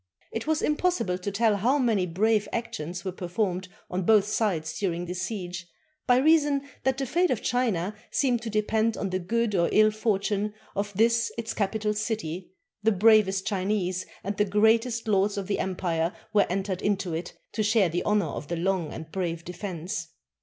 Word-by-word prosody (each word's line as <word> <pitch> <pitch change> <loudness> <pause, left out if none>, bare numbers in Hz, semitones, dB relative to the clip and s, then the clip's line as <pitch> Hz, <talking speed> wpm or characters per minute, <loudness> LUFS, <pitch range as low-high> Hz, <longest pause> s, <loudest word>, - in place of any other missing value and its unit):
It 225 +5 -4
was 315 0 +1
impossible 300 - +1
to 200 +2 -3
tell 210 +1 +2
how 245 +8 +2
many 225 -9 +2
brave 210 +5 +2
actions 175 -6 -4
were 190 - -1
performed 185 +1 -2 0.2
on 180 +1 -2
both 205 +2 +5
sides 175 -7 -1
during 175 -3 -1
this 180 +1 -4
siege, 185 -3 -4 0.4
by 245 -1 +5
reason 290 -1 +3 0.2
that 265 0 +1
the 270 - -1
fate 345 +7 +2
of 245 - -1
China 215 -7 0 0.2
seeming 250 -4 +1
to 230 0 -5
depend 220 +1 +1
on 195 - -2
the 185 - 0
good 225 +4 0
or 170 -3 +2
ill 215 0 +5
fortime 210 -1 0 0.2
of 205 +1 -2
this 230 +2 +3
its 225 -1 -3
capital 210 +1 0
city, 210 -5 -3 0.3
the 220 +1 +3
bravest 200 -2 +4
Chinese 190 -2 -1 0.2
and 200 +1 0
greatest 225 +3 +3
lords 200 0 +2
of 200 - -2
the 200 - -1
empire 175 -3 -1 0.2
were 205 - +4
entered 190 0 -2
into 195 -4 0
it 165 +2 -5
to 220 - -2
share 210 -3 +3
the 175 +2 -1
honor 210 -1 +2
of 145 - -5
the 170 - -2
long 180 -2 0
and 160 0 -8
brave 170 -3 -3
defense. 175 -2 -5
205 Hz, 180 wpm, -27 LUFS, 180-225 Hz, 0.4 s, both